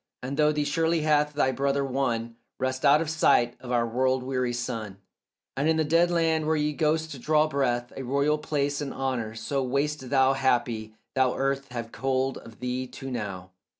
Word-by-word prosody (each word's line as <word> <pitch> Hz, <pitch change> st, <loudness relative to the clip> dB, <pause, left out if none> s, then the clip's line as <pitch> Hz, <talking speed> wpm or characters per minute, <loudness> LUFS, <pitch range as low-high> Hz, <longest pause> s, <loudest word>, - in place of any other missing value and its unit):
And 135 Hz, +2 st, -3 dB
through 150 Hz, 0 st, +3 dB
thee 150 Hz, 0 st, 0 dB
surely 160 Hz, +3 st, +1 dB
hath 150 Hz, -1 st, +2 dB
thy 135 Hz, -2 st, +2 dB
brother 140 Hz, +1 st, 0 dB
won 120 Hz, -4 st, -1 dB, 0.2 s
Rest, 130 Hz, 0 st, -2 dB
out 145 Hz, +3 st, +6 dB
of 165 Hz, -, -2 dB
sight 120 Hz, -6 st, +3 dB
of 125 Hz, -, -8 dB
our 120 Hz, -1 st, +2 dB
world 130 Hz, +2 st, +1 dB
weary 125 Hz, -1 st, -1 dB
sun, 115 Hz, -5 st, -4 dB, 0.6 s
And 140 Hz, +4 st, +1 dB
in 160 Hz, -, +3 dB
the 160 Hz, -, +3 dB
dead 165 Hz, +3 st, +3 dB
land 165 Hz, -2 st, +1 dB
where 160 Hz, -, +2 dB
ye 150 Hz, 0 st, 0 dB
ghosts 155 Hz, 0 st, 0 dB
draw 155 Hz, +4 st, +3 dB
breath 125 Hz, -5 st, -1 dB
A -, -, -5 dB
royal 140 Hz, +4 st, +1 dB
place 145 Hz, -1 st, -1 dB
and 140 Hz, -2 st, -4 dB
honour; 125 Hz, -5 st, -2 dB
so 135 Hz, +4 st, -2 dB
wast 140 Hz, +1 st, -1 dB
thou 135 Hz, -1 st, +4 dB
Happy, 120 Hz, -5 st, 0 dB, 0.2 s
though 130 Hz, -2 st, +2 dB
earth 135 Hz, 0 st, -1 dB
have 120 Hz, -2 st, -6 dB
hold 135 Hz, 0 st, -1 dB
of 115 Hz, -1 st, -14 dB
thee 125 Hz, +1 st, -2 dB
too 135 Hz, +1 st, -8 dB
now. 95 Hz, -6 st, -5 dB
135 Hz, 190 wpm, -27 LUFS, 125-150 Hz, 0.6 s, out